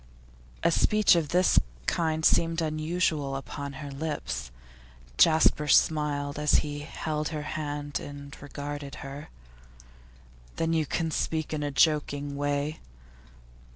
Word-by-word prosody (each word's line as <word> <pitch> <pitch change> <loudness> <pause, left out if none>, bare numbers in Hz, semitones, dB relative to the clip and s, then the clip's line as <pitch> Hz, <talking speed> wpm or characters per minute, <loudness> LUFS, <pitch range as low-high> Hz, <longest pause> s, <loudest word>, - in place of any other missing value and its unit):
A - - +4
speech 215 -3 +4
of 165 -3 +1
this 180 +3 +4 0.3
kind 160 - 0
seemed 165 0 +3
unusual 155 -2 0
upon 140 +1 -6
her 140 0 -7
lips. 140 - -4 0.7
Jasper 155 -2 +5
smiled 145 -1 +2
as 150 0 +3
he 145 0 -4
held 150 0 -3
her 155 -2 -4
hand 145 -1 -3
and 140 0 -9
regarded 145 0 -6
her. 140 +2 -8 1.3
'Then 165 0 0
you 160 -2 +1
can 165 +2 -1
speak 160 0 -1
in 150 - -2
a 145 - -1
joking 145 -1 +1
way? 145 +2 -1
150 Hz, 120 wpm, -28 LUFS, 145-160 Hz, 1.3 s, Jasper